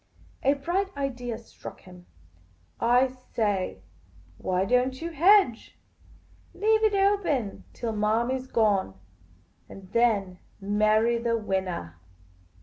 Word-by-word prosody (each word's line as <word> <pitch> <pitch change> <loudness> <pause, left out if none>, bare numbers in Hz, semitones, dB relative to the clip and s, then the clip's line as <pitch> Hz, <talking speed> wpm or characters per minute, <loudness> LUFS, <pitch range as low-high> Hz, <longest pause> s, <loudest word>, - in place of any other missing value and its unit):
A 275 - +3
bright 350 +7 -1
idea 245 -4 -3
struck 230 - -12
him. 180 -1 -15 0.7
"I 245 +2 +4
say 210 - -3 0.3
— 90 0 -27
why 185 +1 0
don't 250 +4 +1
you 335 +1 -5
hedge? 335 - +3 0.8
Leave 440 +1 +2
it 430 -2 +3
open 390 - 0
till 235 -2 -4
Manny 225 +5 +1
's 255 - -11
gone, 205 - +1 0.7
and 190 -1 -12
then 205 -6 +1 0.2
marry 215 +3 +2
the 230 0 0
winnah 185 - -3
230 Hz, 115 wpm, -26 LUFS, 195-265 Hz, 0.8 s, I